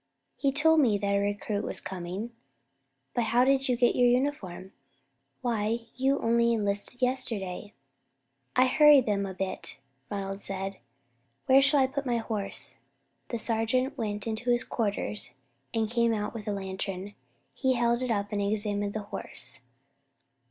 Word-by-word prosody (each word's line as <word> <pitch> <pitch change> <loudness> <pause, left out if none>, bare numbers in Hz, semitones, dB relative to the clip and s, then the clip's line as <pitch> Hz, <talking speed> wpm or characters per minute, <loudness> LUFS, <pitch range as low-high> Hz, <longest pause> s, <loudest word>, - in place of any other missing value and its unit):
"He 275 - +1
told 320 +3 +4
me 230 -8 +4
that 200 0 -1
a 200 - +3
recruit 205 +1 -1
was - - -2
coming, 190 +5 -5 0.8
but 240 - +1
how 245 +3 +3
did 270 0 +3
you 245 - +2
get 240 0 +3
your 245 - +5
uniform? 240 -8 -1 0.7
Why, 230 -1 0
you 270 +2 +2
only 235 -1 +3
enlisted 205 +3 -2
yesterday." 220 -7 -2 0.8
"I 255 - +6
hurried 290 0 +6
them 200 -2 0
up 190 - -7
a - - -27
bit," 190 0 -4 0.3
Ronald 195 -1 -4
said. 195 0 -3 0.7
"Where 270 0 +6
shall 280 0 +4
I - - +5
put 275 +1 -3
my 240 -1 +1
horse?" 215 -3 -1 0.5
The 235 - -3
sergeant 230 +4 0
went 210 -5 -3
into 225 +2 -2
his 240 0 +3
quarters 200 - -2 0.4
and 225 -1 0
came 235 0 +2
out 210 0 -3
with 220 -3 -7
a - - 0
lantern. 195 0 -4 0.4
He 260 -2 +1
held 235 0 +1
it 255 - -2
up 205 -2 -1
and 205 -1 -1
examined 205 0 -1
the 215 - -2
horse. 130 -10 -5
225 Hz, 160 wpm, -28 LUFS, 200-250 Hz, 0.8 s, I